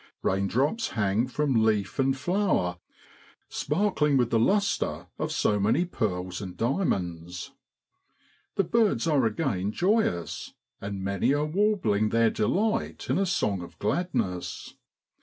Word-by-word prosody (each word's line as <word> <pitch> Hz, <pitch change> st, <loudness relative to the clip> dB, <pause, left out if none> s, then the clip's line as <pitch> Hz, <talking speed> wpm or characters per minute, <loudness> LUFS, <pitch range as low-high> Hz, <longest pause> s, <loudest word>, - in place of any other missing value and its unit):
Kaindrops 125 Hz, -, 0 dB
hang 105 Hz, +2 st, +1 dB
from 130 Hz, -4 st, +1 dB
leaf 105 Hz, -2 st, 0 dB
and 135 Hz, 0 st, +2 dB
flower 145 Hz, -, 0 dB, 0.7 s
sparkling 150 Hz, -4 st, +1 dB
with 120 Hz, -2 st, +1 dB
the 115 Hz, -, +3 dB
lustre 200 Hz, -, +1 dB
of -, -, -2 dB
so 105 Hz, -1 st, +1 dB
many 110 Hz, -, +2 dB
pearls 90 Hz, -, -3 dB
and 95 Hz, -3 st, -7 dB
diamonds. 90 Hz, -, -2 dB, 1.0 s
The 195 Hz, -, +3 dB
birds 215 Hz, -, +2 dB
are 145 Hz, -7 st, +3 dB
again 105 Hz, -, -1 dB
joyous, 180 Hz, -, 0 dB, 0.3 s
and 100 Hz, -1 st, -5 dB
many 100 Hz, +8 st, +1 dB
are 150 Hz, +1 st, +1 dB
warbling 155 Hz, -, +1 dB
their 115 Hz, 0 st, +3 dB
delight 215 Hz, -, 0 dB
in -, -, +2 dB
a 195 Hz, -, +1 dB
song 105 Hz, -, 0 dB
of 85 Hz, -, -11 dB
gladness. 105 Hz, -, -2 dB
115 Hz, 125 wpm, -27 LUFS, -, 1.0 s, the